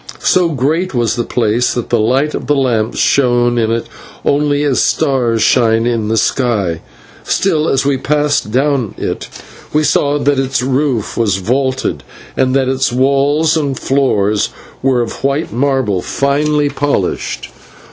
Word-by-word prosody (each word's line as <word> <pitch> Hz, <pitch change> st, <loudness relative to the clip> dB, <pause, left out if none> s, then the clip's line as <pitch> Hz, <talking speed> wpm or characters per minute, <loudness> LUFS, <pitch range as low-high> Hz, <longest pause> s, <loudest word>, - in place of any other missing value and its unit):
So 180 Hz, -2 st, +3 dB
great 155 Hz, +4 st, -1 dB
was 120 Hz, -1 st, +1 dB
the 120 Hz, -, -1 dB
place 115 Hz, 0 st, 0 dB
that 120 Hz, -, -3 dB
the 120 Hz, -, +3 dB
light 130 Hz, +7 st, +1 dB
of -, -, -5 dB
the 145 Hz, -, +2 dB
lamps 120 Hz, -5 st, 0 dB
shone 120 Hz, -2 st, +2 dB
in 110 Hz, -1 st, +1 dB
it 115 Hz, 0 st, -1 dB, 0.4 s
only 145 Hz, 0 st, +1 dB
as 140 Hz, -3 st, +1 dB
stars 120 Hz, -5 st, +1 dB
shine 115 Hz, -2 st, +3 dB
in 115 Hz, -3 st, -1 dB
the 110 Hz, +1 st, 0 dB
sky, 105 Hz, -11 st, 0 dB, 0.4 s
still, 165 Hz, -5 st, 0 dB
as 135 Hz, -, +1 dB
we 140 Hz, -1 st, +1 dB
passed 145 Hz, -2 st, 0 dB
down 130 Hz, -2 st, 0 dB
it, -, -, -4 dB, 0.4 s
we 155 Hz, +1 st, +2 dB
saw 145 Hz, -1 st, +1 dB
that 145 Hz, -1 st, +1 dB
its 135 Hz, -2 st, -1 dB
roof 130 Hz, -4 st, -1 dB
was 105 Hz, -5 st, +1 dB
vaulted, 130 Hz, +6 st, -1 dB, 0.3 s
and 130 Hz, 0 st, +1 dB
that 135 Hz, -1 st, +2 dB
its 130 Hz, -1 st, 0 dB
walls 140 Hz, +5 st, +2 dB
and 140 Hz, -4 st, -1 dB
floor 130 Hz, -7 st, +1 dB, 0.5 s
were 130 Hz, -2 st, +2 dB
of 115 Hz, -, -5 dB
white 140 Hz, -2 st, -1 dB
marble 130 Hz, -7 st, 0 dB
finely 145 Hz, +4 st, 0 dB
polished. 140 Hz, -9 st, -2 dB
130 Hz, 155 wpm, -14 LUFS, 115-145 Hz, 0.5 s, So